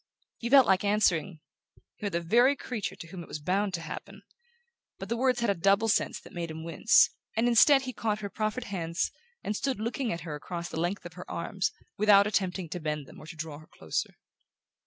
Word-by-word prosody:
He 235 - -3
felt 270 -1 +8
like 190 0 +3
answering: 190 -5 +1 0.6
"You're 205 - -2
the 170 -2 -1
very 240 +11 +4
creature 245 -7 -4
to 170 - -10
whom 180 0 -7
it - - -10
was - - -5
bound 190 +6 0
to 170 - -5
happen"; 165 - -8 0.7
but - - -8
the 235 - 0
words 250 0 +1
had 235 -4 +2
a - - +2
double 195 +5 +3
sense 220 - +1
that - - -15
made 170 -2 -4
him 160 0 -7
wince, 165 +6 +4 0.3
and 230 +2 +3
instead 270 +4 +6
he 255 -1 -5
caught 215 -1 -2
her 200 - -4
proffered 215 +3 -2
hands 170 -6 -2 0.3
and 210 - -2
stood 265 +1 -1
looking 230 +2 -2
at 170 - -4
her 155 -1 -6
across 170 +3 -5
the - - -4
length 175 +3 -2
of 175 - -8
her 180 +2 -10
arms, 185 +3 -2 0.3
without 200 -1 +6
attempting 190 -3 -1
to 180 - -4
bend 150 -2 -3
them - - -14
or 155 - -12
to 165 - -9
draw 155 -2 -6
her 155 - -16
closer. 80 - -4
195 Hz, 220 wpm, -29 LUFS, 170-220 Hz, 0.7 s, felt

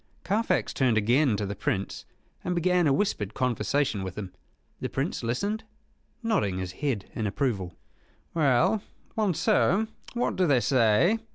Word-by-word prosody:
Carfax 210 +6 0
turned 125 -5 +2
again 120 +3 +3
to 105 - -2
the 100 - -3
Prince, 100 0 -2 0.4
and 180 - -1
began 175 0 +3
a - - +4
whispered 135 - 0
conversation 125 -2 0
with 95 0 -6
him. 95 -4 -6 0.5
The - - -3
Prince - - -2
listened, 200 - -1 0.6
nodding 190 - +1
his 95 -1 -3
head 120 0 -2
in 110 - -2
approval. 100 -6 -2 0.6
"Well, 165 - +3 0.3
Monceux, 215 +1 +2 0.3
what 240 - 0
do 185 -1 +3
they 140 -4 +4
say?" 130 - +3
135 Hz, 145 wpm, -27 LUFS, -, 0.6 s, a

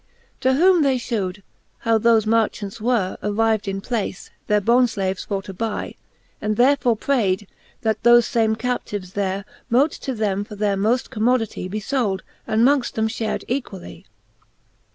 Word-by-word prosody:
X. - - -37
To 260 +1 +3
whom 350 +4 +5
they 270 -3 +3
fhewed, 205 -6 -3 0.4
how 225 -1 +2
thofe 225 -1 +4
marchants 215 -2 0
were 225 -5 0
Arriv'd 215 0 +1
in 195 0 -3
place, 215 -4 -4 0.2
their 210 0 +3
bondflaves 210 -4 +1
for 195 -2 -2
to 195 - -8
buy, 220 +3 -3 0.5
And 215 0 -1
therefore 250 -2 +3
prayd, 205 -6 0 0.4
that 220 -1 0
thofe 240 0 +6
fame 225 -3 +1
captives 210 -6 -4
there 195 -1 -2 0.2
Mote 265 +6 +3
to 265 - -5
them 205 -2 -1
for 210 - -10
their 205 -1 0
moft 225 +6 0
commodity 225 -4 0
Be 210 +3 -3
fold, 215 -5 -1 0.2
and 220 +2 +3
mongft 275 -3 +1
them 220 0 0
fhared 220 -1 -3
equally. 240 -8 -5
220 Hz, 155 wpm, -22 LUFS, 200-245 Hz, 0.5 s, thofe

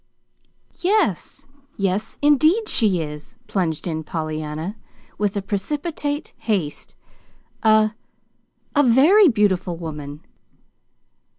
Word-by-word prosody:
"Yes 350 - 0 0.3
yes, 195 +1 -1
indeed 310 - +4
she 200 - +3
is," 150 0 -9
plunged 165 -6 -2
in 160 -3 -3
Pollyanna, 155 +3 -4 0.4
with 205 -1 0
precipitate 290 - -3
haste; 190 -10 -3 0.7
"a 215 -1 +4 0.8
a 290 - +5
very 295 - +6
beautiful 195 - +1
woman." 150 -3 -7
205 Hz, 85 wpm, -22 LUFS, -, 0.8 s, very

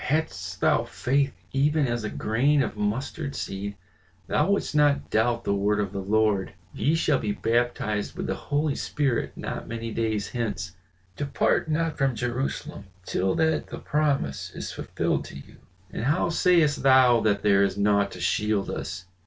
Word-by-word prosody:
"Hadst 95 - -2
thou - - +3
faith 140 +2 0 0.2
even 145 +2 +2
as 120 -1 -2
a 105 - -2
grain 135 +6 +2
of - - -4
mustard 130 +8 -3
seed 100 +1 -4 0.5
thou 185 - +1
wouldst 200 -5 0
not 145 -1 +2
doubt 115 +2 +1
the - - 0
word 100 +1 +1
of 100 -2 -1
the 100 -1 -4
Lord, 105 -1 +1 0.2
'Ye 155 +3 +1
shall 155 -4 +2
be 105 -1 -1
baptized 115 -2 -1
with - - -3
the - - -1
Holy 145 0 -1
Spirit 135 -6 -1
not - - -5
many 115 0 -5
days 110 -3 -1
hence; 105 -6 -3 0.4
depart 145 +2 0
not 160 0 -1
from 135 -3 +2
Jerusalem 120 -3 -3 0.2
till 95 0 0
that 160 -1 +1
the - - -7
promise 140 - -1
is - - -5
fulfilled - - -2
to - - -10
you!' - - -12 0.3
And 115 - -4
how 155 +5 +2
sayest 170 -3 +3
thou 130 -3 +6
that 105 -2 +1
there 100 -1 +4
is 100 -1 +1
naught 100 0 +3
to 90 - -9
shield 100 +4 0
us. 85 +3 -5
115 Hz, 170 wpm, -26 LUFS, 100-145 Hz, 0.5 s, thou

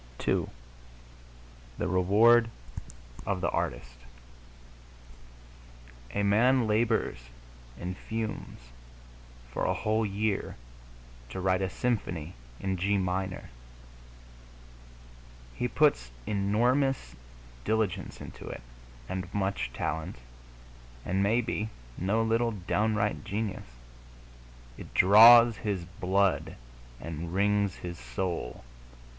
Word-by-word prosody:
II - - +2 1.3
THE - - -1
REWARD 110 +6 +5 0.8
OF 95 - 0
THE 85 - 0
ARTIST - - -3 2.2
A 100 - +1
man 120 +5 +4
labors 110 - +1 0.6
and 90 +1 -4
fumes 110 +2 -5 0.9
for - - -3
a - - +1
whole 110 +1 0
year 105 0 -1 0.7
to 75 - -6
write 95 0 +1
a 95 - 0
symphony 90 -8 -2 0.3
in 95 -1 -2
G 100 +3 +1
minor. 95 -2 -3 2.0
He - - -1
puts - - +2 0.2
enormous 105 - +1 0.5
diligence 100 - -1
into - - -10
it, - - -7 0.4
and 95 -1 -4
much 95 -7 -1
talent, 80 +5 -3 0.9
and 95 +2 0
maybe 110 +1 0 0.3
no 100 - +1
little 115 +1 +2
downright 105 +2 0
genius. 105 - -4 1.1
It - - -11
draws 115 +3 +8
his 100 -5 -3
blood 95 +2 0 0.4
and 85 +2 -6
wrings 100 0 +2
his 85 -2 -7
soul. 60 +4 -4
100 Hz, 95 wpm, -29 LUFS, 90-110 Hz, 2.2 s, draws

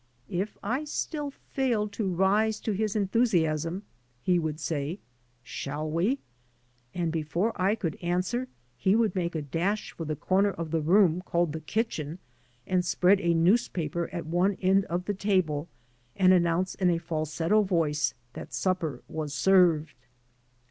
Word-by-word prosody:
'' 125 - -26
K 180 0 +1 0.2
I 250 +8 -1
still 295 0 -3
failed 240 -6 -2
to 200 -3 -1
rise 205 +4 +2
to 220 - -1
his 210 +1 -1
enthusiasm, 185 -5 +1 0.4
he 180 -1 +3
would 155 -2 -3
say 155 +2 -2 0.2
" 120 +1 -40 0.2
Shall 145 +3 -3
we? 190 - +1 0.8
and 170 -2 0
before 165 +7 -1
I 195 +3 +2
could 170 -8 -4
answer 185 +9 -1 0.3
he 190 - +3
would 225 -4 +2
make 175 -2 -2
a 155 - -2
d£^sh 175 +9 -1
for 165 - -6
the 155 0 -2
comer 195 +7 +2
of 165 -5 -5
the 165 -1 +1
room 180 +1 +4
caDed 170 -2 +1
the 160 - -4
kitchen, 160 -4 -2 0.5
and.spread 185 +1 +3
a 170 -1 +2
newspaper 170 -3 +1
at 170 - -4
one 180 +4 +1
end 190 +1 +3
of 175 +1 -3
the 205 - -1
table, 185 -7 0 0.5
and 185 -1 +5
announce 175 +1 +2
in 185 -2 +1
a 170 - +2
falsetto 165 +4 0
voice 155 -8 +1 0.2
that - - -7
supper 165 -9 -1
was 150 -2 -4
served. 165 -2 +4
180 Hz, 155 wpm, -28 LUFS, 160-200 Hz, 0.8 s, and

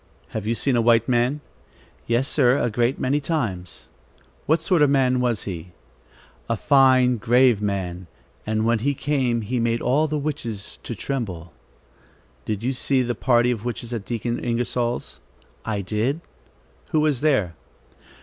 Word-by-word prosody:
"Have 110 -1 -5
you 115 - +1
seen 135 +2 0
a 120 - +3
white 115 0 +4
man?" 125 +4 +1 0.7
"Yes 120 +4 +1
sir, 130 -3 +3
a 120 - 0
great 120 +4 +1
many 140 +3 +1
times." 115 - -3 0.6
"What 160 +2 +3
sort 165 0 +1
of 145 - +5
a - - +1
man 130 -2 +3
was 120 -4 0
he?" 90 -2 -7 0.8
"A 115 - 0
fine, 130 -2 +4
grave 120 0 +3
man, 95 -3 -3 0.4
and 110 0 -1
when 115 0 +2
he 140 +5 0
came, 130 -5 0
he 120 +4 -2
made 115 0 +1
all 145 +7 +2
the 155 0 -2
witches 125 -9 -5
to 120 - -6
tremble." 95 - -4 0.9
"Did 105 0 -3
you 130 +2 0
see 130 0 +1
the 120 0 -1
party 120 +1 +2
of 110 -3 -3
witches 120 0 -4
at 115 -4 -3
Deacon 120 +2 -2
Ingersol's?" 120 0 -2 0.5
"I 105 -2 -2
did." 110 - -1 0.7
"Who 155 - +1
was 150 -5 +1
there?" 130 - +2
120 Hz, 160 wpm, -23 LUFS, 110-135 Hz, 0.9 s, of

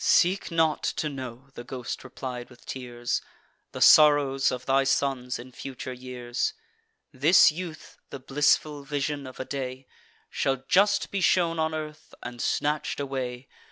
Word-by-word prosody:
"Seek 185 +3 +3
not 160 -2 +2
to 155 - -1
know," 130 -1 -8
the 120 - -8
ghost 125 -1 -6
replied 125 -1 -7
with 125 -1 -18
tears, 120 -2 -3 0.5
"The - - -7
sorrows 145 -3 +6
of 125 0 -5
thy 135 0 +3
sons 135 -2 0
in 125 +2 -11
future 130 0 -7
years. 125 -1 -3 0.6
This 155 +5 +6
youth 165 0 -8
(the - - -6
blissful 145 +2 +1
vision 145 0 -3
of 130 - -11
a 130 - -3
day) 130 -1 -5 0.5
Shall 135 -1 -1
just 200 +2 +3
be 200 - -1
shown 170 -2 +2
on 160 0 0
earth, 155 0 -7
and 120 0 -7
snatch'd 150 0 -1
away. 130 -2 -4
135 Hz, 150 wpm, -27 LUFS, 125-150 Hz, 0.6 s, sorrows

